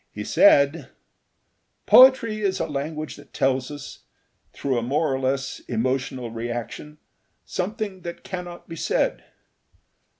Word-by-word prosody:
He - - -6
said: 145 - +4 1.0
"Poetry 250 -4 +6
is 195 -2 0
a - - 0
language 155 +2 -5
that 145 -1 -16
tells 130 -1 +1
us, 145 -1 -9 0.5
through 130 -3 -1
a - - -3
more 140 +5 0
or 130 - -1
less 130 0 -2
emotional 125 0 -2
reaction, 120 +6 -6 0.5
something 200 0 -4
that 170 0 -8
cannot 180 -2 -7
be 165 - -7
said. - - 0
145 Hz, 125 wpm, -24 LUFS, 130-180 Hz, 1.0 s, Poetry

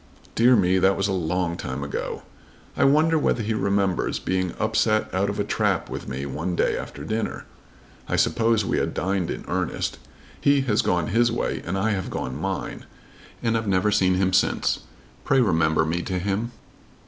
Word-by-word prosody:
Dear 125 +2 +5
me, 95 -3 +3
that 95 +1 +3
was 100 - +1
a - - -1
long 90 -1 -1
time 65 +2 -4
ago. 70 - -4 0.5
I - - +3
wonder 155 +3 +4
whether 120 -5 +1
he 110 +2 -1
remembers 100 -3 0
being 95 -1 -1
upset 110 0 +1
out 95 +2 +1
of 100 - -4
a - - +2
trap - - 0
with - - -6
me 65 +2 -4
one 80 +6 -3
day - - +1
after 70 - -6
dinner. 110 +8 -3 0.6
I - - +1
suppose 115 -2 +2
we - - 0
had - - -2
dined 95 -2 -1
in - - -5
earnest. - - -2 0.4
He 140 -1 +4
has 115 -6 +2
gone 85 -3 0
his 120 +3 +3
way, 115 - -2
and 95 +2 -2
I 110 +3 +1
have 95 -3 -2
gone 65 - -4
mine, - - -4 0.6
and 115 -1 +1
I've 115 -1 -1
never 95 +2 +2
seen 95 -3 +3
him 95 0 +1
since. 90 - +2 0.4
Pray 135 -2 +3
remember 80 -8 +3
me 85 +2 -1
to 95 +1 -3
him." 100 +6 -2
95 Hz, 185 wpm, -24 LUFS, 90-110 Hz, 0.6 s, Dear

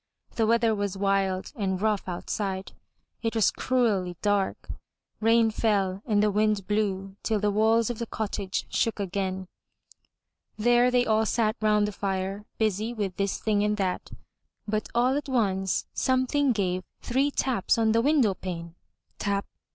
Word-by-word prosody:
The 225 -2 +2
weather 230 0 +3
was 200 -2 -2
wild 195 -1 0
and 190 -3 -1
rough 210 -1 0
outside; 190 +2 -3 0.5
it 225 0 -2
was 220 -3 +4
cruelly 205 -9 0
dark; 205 -2 0 0.5
rain 225 0 +4
fell 200 -4 0
and 210 -2 +3
the 210 - +3
wind 210 -1 +1
blew 195 -2 -1
till 220 -2 0
the 205 0 +1
walls 220 +2 +3
of 235 - -7
the 235 - -3
cottage 200 -3 -3
shook 225 -2 0
again. 190 -1 -2 1.1
There 240 +3 +4
they 250 0 +3
all 220 0 +2
sat 220 0 +1
round 210 -1 +3
the - - -3
fire, 195 0 -3
busy 220 +2 0
with 200 -4 -2
this 200 -1 0
thing 210 -2 +1
and 210 0 +1
that. 185 -3 -2 0.6
But 215 0 -2
all 250 +3 +3
at 290 0 -3
once, 195 -7 0
something 260 +2 +2
gave 185 -5 0 0.2
three 270 +4 +1
taps 255 -9 +1
on 225 -1 +3
the 230 +1 +3
window 270 -6 +3
pane 170 -3 -6 0.2
— - - -46
tap! 200 -1 -1
210 Hz, 160 wpm, -27 LUFS, 195-230 Hz, 1.1 s, was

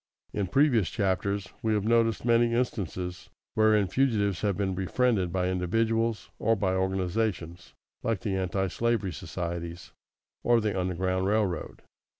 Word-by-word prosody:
In 100 -2 -1
previous 120 - +3
chapters 100 -1 -1
we 110 -1 +1
have 105 - 0
noticed 115 0 +2
many 115 0 +3
instances 90 -7 -3 0.2
wherein 110 -2 +4
fugitives 100 -4 +1
have 100 -4 0
been 95 -2 0
befriended 95 0 +1
by 90 0 0
individuals, 115 +5 0
or 115 +1 +3
by 95 -3 0
organizations 95 -2 -2 0.3
like 115 -4 -1
the 100 -3 -1
Antislavery 95 +3 0
Societies 85 0 -5 0.5
or 120 -1 +4
the 105 -2 -1
Underground 95 0 0
Railroad. 100 -5 -1
100 Hz, 130 wpm, -28 LUFS, 90-115 Hz, 0.5 s, wherein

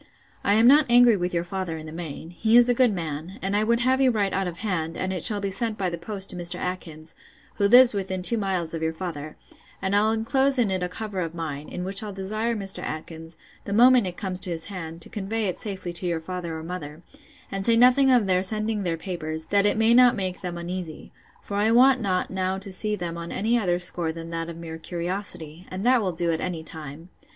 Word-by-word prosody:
I 200 - +3
am 225 +2 +4
not 290 +3 +6
angry 240 -1 +6
with 180 -2 -2
your 170 -1 -1
father 180 -2 -4
in 155 - -9
the 155 - -8
main; 165 0 -7
he 220 +6 +3
is 245 0 +6
a - - +5
good 245 -1 +3
man; 165 0 -5
and 195 +2 -2
I 210 - +2
would 235 +2 +1
have 260 +1 +2
you 265 - +5
write 205 -5 0
out 190 -1 0
of 175 -1 -6
hand, 165 -5 -2
and 185 0 -2
it 180 - -3
shall 210 -2 +4
be 200 -1 -3
sent 225 +1 -1
by 185 -2 -1
the 170 - -4
post 195 +2 -2
to - - -8
Mr. 175 0 -4
Atkins, 165 -3 -5 0.4
who 200 - +3
lives 245 +2 +7
within 190 -2 -3
two 230 +4 0
miles 185 -5 -1
of 165 - -4
your 160 0 -1
father, 160 -4 -6 0.4
and 195 +1 -1
I'll 215 +2 +3
enclose 265 +5 +2
it 230 -6 +2
in 185 -1 -1
a 180 - -2
cover 205 0 -5
of 170 -2 -3
mine, 155 -3 -5
in 180 - -5
which 195 +1 +2
I'll 210 -1 -5
desire 215 +5 -2
Mr. 195 -2 -1
Atkins, 160 +1 -6 0.3
the 200 - -3
moment 245 -1 +6
it 180 - -6
comes 185 -3 -3
to 185 0 0
his 165 +2 -4
hand, 165 -3 -6
to - - -10
convey 215 +2 -3
it 185 - -3
safely 185 -4 -5
to 175 +1 -3
your 170 -2 -1
father 170 -1 -5
or 160 - -7
mother; 165 -2 -7 0.5
and 195 0 -3
say 230 +2 +4
nothing 255 +3 +5
of 245 -5 +4
their 185 -1 +2
sending 215 +2 0
their 170 -3 -1
papers, 160 -3 -4
that 200 0 +4
it 205 - +1
may 225 +1 +4
not 245 0 +6
make 185 -2 -3
them 175 -2 -5
uneasy; 170 -2 -6 0.3
for 200 - -4
I 210 +2 +2
want 255 +2 +5
not 185 -4 -1
now 190 0 -1
to 195 0 -3
see 210 +3 0
them 170 -3 -5
on 170 0 -7
any 225 +4 0
other 180 -7 +1
score 175 -2 +1
than 165 +1 -8
that 165 0 -4
of 165 - -8
mere 165 -1 -8
curiosity; 175 -1 -5
and 190 +3 -5
that 250 -1 +4
will 190 -3 -1
do 170 0 0
at 160 - -2
any 170 -3 -3
time. 160 +1 -10
185 Hz, 250 wpm, -25 LUFS, 170-215 Hz, 0.5 s, lives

